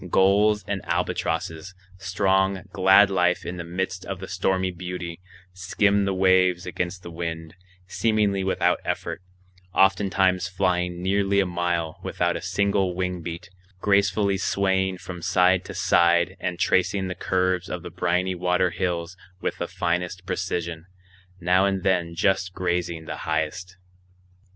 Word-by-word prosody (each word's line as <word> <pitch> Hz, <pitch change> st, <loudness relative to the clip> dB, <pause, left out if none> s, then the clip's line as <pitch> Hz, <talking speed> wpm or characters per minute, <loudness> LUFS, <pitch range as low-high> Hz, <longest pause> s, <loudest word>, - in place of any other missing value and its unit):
Gulls 105 Hz, +2 st, +3 dB
and 100 Hz, -2 st, -2 dB
albatrosses, 80 Hz, +2 st, -2 dB, 0.2 s
strong, 95 Hz, +1 st, +1 dB
glad 95 Hz, +2 st, +6 dB
life 90 Hz, -1 st, +1 dB
in 90 Hz, -, -5 dB
the 85 Hz, -, -4 dB
midst 90 Hz, +2 st, -3 dB
of 95 Hz, -2 st, -5 dB
the 95 Hz, -, -7 dB
stormy 95 Hz, +1 st, 0 dB
beauty, 90 Hz, -1 st, -6 dB, 0.3 s
skimmed 100 Hz, +2 st, +1 dB
the 100 Hz, -, 0 dB
waves 95 Hz, -1 st, +3 dB
against 90 Hz, +1 st, -4 dB
the 85 Hz, -, -8 dB
wind, 80 Hz, -1 st, -5 dB, 0.3 s
seemingly 105 Hz, -1 st, +1 dB
without 95 Hz, -, +1 dB
effort, -, -, -3 dB, 0.5 s
oftentimes 95 Hz, -1 st, +3 dB
flying 90 Hz, -1 st, -1 dB
nearly 100 Hz, +1 st, +2 dB
a 100 Hz, -, +3 dB
mile 85 Hz, -2 st, -2 dB
without 85 Hz, 0 st, -1 dB
a -, -, -4 dB
single 95 Hz, 0 st, 0 dB
wing 90 Hz, -1 st, -2 dB
beat, 85 Hz, +3 st, -7 dB, 0.3 s
gracefully 100 Hz, 0 st, +2 dB
swaying 95 Hz, -1 st, 0 dB
from 90 Hz, -1 st, -8 dB
side 90 Hz, +1 st, +3 dB
to -, -, -8 dB
side 85 Hz, +2 st, +3 dB
and 90 Hz, -1 st, -3 dB
tracing 95 Hz, +2 st, +1 dB
the 90 Hz, -, -3 dB
curves 90 Hz, 0 st, 0 dB
of 90 Hz, -1 st, -5 dB
the -, -, -8 dB
briny 90 Hz, +1 st, 0 dB
water 90 Hz, 0 st, +1 dB
hills 85 Hz, 0 st, -2 dB, 0.2 s
with -, -, -3 dB
the -, -, -2 dB
finest 90 Hz, +1 st, -2 dB
precision, 85 Hz, -2 st, -3 dB, 0.5 s
now 90 Hz, +2 st, +3 dB
and 95 Hz, -2 st, -1 dB
then 85 Hz, -3 st, +1 dB
just 95 Hz, 0 st, +1 dB
grazing 85 Hz, -3 st, -2 dB
the -, -, -5 dB
highest. 80 Hz, +3 st, -3 dB
90 Hz, 140 wpm, -24 LUFS, 90-95 Hz, 0.5 s, glad